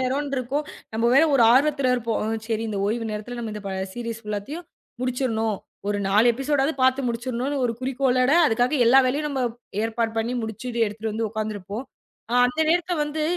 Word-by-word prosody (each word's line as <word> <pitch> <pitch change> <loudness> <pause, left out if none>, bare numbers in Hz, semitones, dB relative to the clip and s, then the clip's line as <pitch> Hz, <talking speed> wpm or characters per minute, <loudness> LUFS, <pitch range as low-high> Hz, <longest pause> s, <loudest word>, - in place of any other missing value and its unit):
நேரம் 270 +3 -1
இருக்கும், 270 +4 -1 0.3
நம்ம 230 +2 +2
வேற 275 - +7
ஒரு 250 - +5
ஆர்வத்துல 275 0 +3
இருப்போம். 230 -3 -1 0.2
சரி 225 -1 -1
இந்த 205 -2 -3
ஓய்வு 225 +2 -1
நேரத்துல 215 +3 -5
நம்ம 225 -2 -4
இந்த 210 - -7
ப 195 - -3 0.2
சீரீஸ் 230 -1 -5
ஃபுல்லாத்தையும் 210 - -5 0.4
முடிச்சுடனும். 235 -4 0 0.3
ஒரு 205 0 0
4 210 +4 +4
எபிசோட் 270 +3 0
ஆவது 305 +2 0
பாத்து 260 +1 +4
முடிச்சுடனும்னு 245 +4 -2
ஒரு 235 - +1
குறிக்கோளோட 255 0 +1
அதுக்காக 245 +5 +1
எல்லா 260 +3 +7
வேலையும் 290 +4 0
நம்ம 275 -2 -2 0.4
ஏற்பாடு 225 0 -1
பண்ணி 235 +3 -1
முடிச்சுட்டு 230 +1 -2
எடுத்துட்டு 215 +1 -4
வந்து 225 0 -1
உக்காந்து 215 0 -3
இருப்போம். 205 +6 -6 0.5
அ. - - +2
அந்த 310 +6 -3
நேரத்துல 350 -1 +1
வந்து 305 +1 -3
240 Hz, 180 wpm, -24 LUFS, 220-270 Hz, 0.5 s, வேற